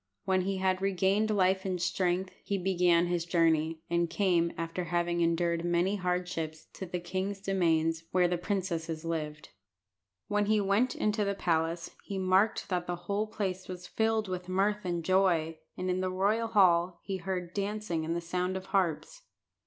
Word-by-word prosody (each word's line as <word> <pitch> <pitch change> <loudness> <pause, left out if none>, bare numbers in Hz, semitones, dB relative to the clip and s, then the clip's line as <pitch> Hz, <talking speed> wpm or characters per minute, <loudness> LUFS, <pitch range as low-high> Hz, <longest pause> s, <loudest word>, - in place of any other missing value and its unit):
When 190 -1 +2
he 195 +1 -1
had 185 0 +1
regained 195 +2 +2
life 190 -2 +2
and 185 -2 -2
strength, 180 +1 0
he 200 - -1
began 180 -2 +3
his 175 -1 0
journey, 165 -2 +1
and 170 0 +1
came, 170 -2 +2
after 165 +2 -3
having 175 0 0
endured 170 0 +1
many 175 +4 +1
hardships, 180 -4 -2
to 190 - -6
the 180 +1 -3
king's 190 +3 -3
demesnes, 165 -4 +1
where 180 -1 +3
the 175 0 -1
princesses 170 -4 -2
lived. 155 -2 -4 0.8
When 205 0 +1
he 215 0 +3
went 205 +6 +2
into 210 0 0
the 200 0 -1
palace, 165 -2 0
he 200 - -5
marked 190 +3 +2
that 180 -2 -1
the 175 - -1
whole 205 +3 0
place 190 -3 -3
was 180 -1 -7
filled 220 -1 0
with 180 -1 -5
mirth 200 +2 +1
and 175 -2 -2
joy, 170 -4 +2 0.2
and 185 - -3
in 185 0 0
the 185 - 0
royal 205 +5 +1
hall 180 -5 +3
he 195 -1 -3
heard 185 -2 -4
dancing 205 -4 -2
and 165 +1 -2
the 170 - -2
sound 180 +2 -2
of 190 - -7
harps. 195 - 0
180 Hz, 175 wpm, -30 LUFS, 170-195 Hz, 0.8 s, began